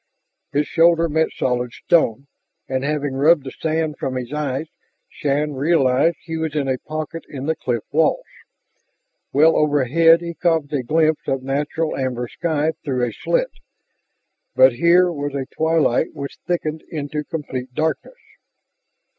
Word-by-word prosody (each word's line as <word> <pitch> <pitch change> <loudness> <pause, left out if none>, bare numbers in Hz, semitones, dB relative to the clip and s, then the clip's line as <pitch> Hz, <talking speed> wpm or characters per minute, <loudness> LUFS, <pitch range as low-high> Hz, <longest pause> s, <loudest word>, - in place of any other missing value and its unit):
His 145 +1 +1
shoulder 170 0 +4
met 160 +1 +1
solid 125 -1 -1
stone, 140 - +1 0.4
and 130 0 -2
having 145 -1 -1
rubbed 145 +3 +4
the 130 - -7
sand 160 -1 -2
from 130 - -3
his 125 +1 -5
eyes, 150 -1 -2 0.4
Shann 145 +1 -1
realized 140 +1 +2
he 165 0 -5
was 160 -2 -3
in 145 -2 0
a 130 -1 -1
pocket 155 +1 -6
in 135 -1 -6
the 160 +1 0
cliff 120 -6 -2
walls. 160 - +2 1.1
Well 155 +3 +5
overhead 150 +3 +4
he 170 0 -5
caught 160 -3 0
a 140 - +1
glimpse 155 +4 +1
of 135 -1 -1
natural 145 +4 -2
amber 125 -2 -2
sky 155 +2 -1
through 130 -4 0
a 115 - -5
slit, - - -1 1.0
but 130 -1 +6
here 175 +7 +4
was 145 -3 -4
a 135 -1 -2
twilight 160 -6 +1
which 140 0 -7
thickened 160 -3 -2
into 150 -1 -4
complete 130 -5 -6
darkness. 160 - -2
150 Hz, 145 wpm, -21 LUFS, 135-160 Hz, 1.1 s, but